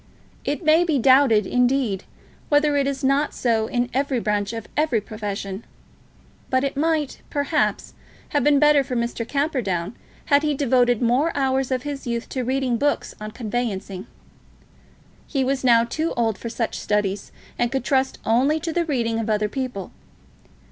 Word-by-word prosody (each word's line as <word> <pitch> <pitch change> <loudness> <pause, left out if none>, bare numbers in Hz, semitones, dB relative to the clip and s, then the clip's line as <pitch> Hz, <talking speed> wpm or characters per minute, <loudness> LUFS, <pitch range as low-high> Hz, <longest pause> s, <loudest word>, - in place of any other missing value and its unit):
It 290 +4 -3
may 315 +3 +5
be 320 -5 +1
doubted, 260 -4 +5
indeed, 250 -5 +1 0.4
whether 290 0 +3
it 280 -1 +2
is 275 -1 -3
not 275 +3 +1
so 225 -3 +1
in 245 +1 0
every 270 -1 0
branch 210 -2 -1
of 225 -2 -6
every 300 -7 +2
profession. 205 -1 -5 0.9
But 260 0 +2
it 275 - -2
might, 305 -1 0
perhaps, 290 +2 -1 0.4
have 290 -3 +1
been 290 +1 +4
better 295 -1 +5
for 260 -1 -5
Mr. 235 -1 -2
Camperdown 240 - -1 0.3
had 285 -1 +4
he 300 -1 0
devoted 250 -3 +2
more 255 +8 +2
hours 265 -1 +1
of 260 -1 -1
his 285 -3 -5
youth 235 0 -3
to 260 - -3
reading 255 -1 0
books 290 +4 0
on 215 - -5
conveyancing. 215 -4 -4 1.2
He 275 -3 0
was 265 +1 -1
now 235 -2 +5
too 310 +8 -2
old 225 -3 +1
for 230 - -6
such 230 0 -3
studies, 205 -1 -1 0.3
and 240 -1 +1
could 270 -2 -1
trust 265 -1 +1
only 265 +8 +2
to 330 0 -4
the 340 0 +1
reading 235 -7 -1
of 225 0 -3
other 210 0 +1
people. 250 -6 -4
255 Hz, 165 wpm, -23 LUFS, 225-285 Hz, 1.2 s, may